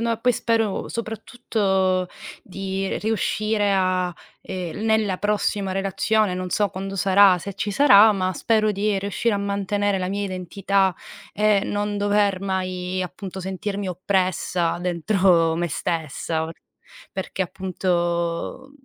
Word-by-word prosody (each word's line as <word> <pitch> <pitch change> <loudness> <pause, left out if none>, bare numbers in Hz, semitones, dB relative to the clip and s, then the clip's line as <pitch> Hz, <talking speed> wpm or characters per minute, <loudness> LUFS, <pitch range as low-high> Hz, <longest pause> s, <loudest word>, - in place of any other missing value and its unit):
No, 230 0 0
poi 245 +1 +2
spero 225 -4 0
soprattutto 195 -5 -1 0.3
di 195 0 -3
riuscire 215 -1 0
a, 185 -2 +1 0.3
ehm, 180 -2 -5
nella 220 -4 +1
prossima 205 -2 0
relazione, 195 +1 +1
non 185 0 -3
so 205 +1 +1
quando 195 +2 -5
sarà, 195 0 +5
se 200 +3 -6
ci 205 - -3
sarà, 220 -3 +7
ma 185 -1 -1
spero 215 0 +1
di 205 0 0
riuscire 205 +3 -1
a - - +1
mantenere 200 0 0
la 185 0 -2
mia 200 +1 -2
identità 190 0 0 0.4
e 210 -1 +3
non 205 0 -2
dover 205 -2 +2
mai 185 -1 -2
appunto 185 +1 -7
sentirmi 195 +1 -4
oppressa 180 -2 0
dentro 175 -1 +2
me 175 +1 -1
stessa, 160 +1 -2 0.6
perché 190 0 -3
appunto, 175 +5 -2
195 Hz, 125 wpm, -23 LUFS, 185-205 Hz, 0.6 s, sarà